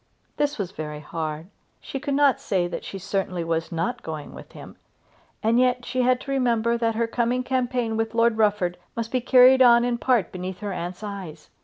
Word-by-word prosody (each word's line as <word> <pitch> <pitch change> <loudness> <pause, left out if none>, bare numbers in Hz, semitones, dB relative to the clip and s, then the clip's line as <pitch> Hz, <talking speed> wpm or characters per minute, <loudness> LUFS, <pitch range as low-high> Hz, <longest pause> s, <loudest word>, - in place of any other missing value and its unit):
This 290 0 0
was 195 -4 -3
very 150 -5 -6
hard. 155 0 -5 0.3
She 270 - -6
could 280 0 -2
not 280 -2 +4
say 190 -9 0
that - - -6
she 195 - -7
certainly 185 -2 -2
was 165 0 -2
not 165 0 -2
going 155 -2 -7
with - - -12
him. - - -12 0.7
And 230 +2 +3
yet 250 -1 +2
she 255 - -1
had 250 0 +3
to 275 - -6
remember 235 -3 +1
that 230 -1 0
her 230 +1 +1
coming 240 +2 0
campaign 245 -3 -1
with 225 0 -2
Lord 230 0 +3
Rufford 200 -5 +1 0.2
must 230 -1 -4
be 255 - 0
carried 260 +1 +6
on 240 -1 +6
in 240 -1 -1
part 240 -9 +1
beneath 185 +1 -6
her 205 -2 -3
aunt's 180 +3 -6
eyes. 190 -7 -8
225 Hz, 200 wpm, -24 LUFS, 180-250 Hz, 0.7 s, carried